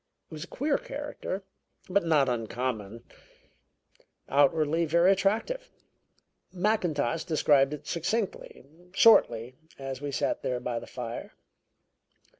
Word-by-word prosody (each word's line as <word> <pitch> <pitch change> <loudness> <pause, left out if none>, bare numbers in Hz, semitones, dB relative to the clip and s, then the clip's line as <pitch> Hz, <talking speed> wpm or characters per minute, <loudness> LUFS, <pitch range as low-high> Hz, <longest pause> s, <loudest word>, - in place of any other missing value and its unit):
It - - -9
was 155 0 -6
a - - -14
queer 285 +1 +1
character, 285 -9 -5 0.4
but 195 +1 +2
not 155 -5 +3
uncommon. 115 -2 -3 1.2
Outwardly 155 +3 +3
very 170 +4 +4
attractive. 220 - 0 0.8
Mackintosh 175 - 0
described 145 -4 +3
it 150 - -7
succinctly, 190 - -3 0.3
shortly, 125 - +5 0.2
as 135 -1 -6
we 145 -1 -3
sat - - -1
there 125 -1 -2
by 120 -1 -3
the - - -11
fire. 120 -2 -6
150 Hz, 110 wpm, -28 LUFS, 130-190 Hz, 1.2 s, shortly